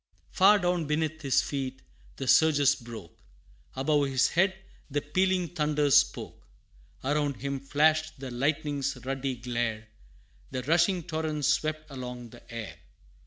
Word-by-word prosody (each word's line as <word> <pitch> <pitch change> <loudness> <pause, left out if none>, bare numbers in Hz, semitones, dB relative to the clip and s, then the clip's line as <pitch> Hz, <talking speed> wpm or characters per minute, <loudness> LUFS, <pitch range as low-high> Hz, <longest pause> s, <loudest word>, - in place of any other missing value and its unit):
Far 205 +2 +6
down 175 -3 0
beneath 155 +1 -1
his 135 -4 +2
feet, 135 -2 -4 0.3
the 135 - -5
surges 145 -3 +5
broke; 115 - -10 0.6
Above 145 +2 +2
his 135 -2 +2
head 190 +2 +2 0.3
the 145 +1 0
pealing 185 +4 0
thunders 150 -4 +1
spoke; - - -1 0.6
Around 145 0 0
him 140 +1 -4
flashed 155 +2 +1
the 130 -2 -6
lightning's 140 +1 -1
ruddy 135 0 -2
glare, 115 -2 -3 0.6
And 130 0 -4
rushing 170 +2 +3
torrents 155 -2 -1
swept 155 -1 -1
along 125 -3 -7
the 120 - -14
air. 115 -3 -7
145 Hz, 130 wpm, -28 LUFS, 130-155 Hz, 0.6 s, Far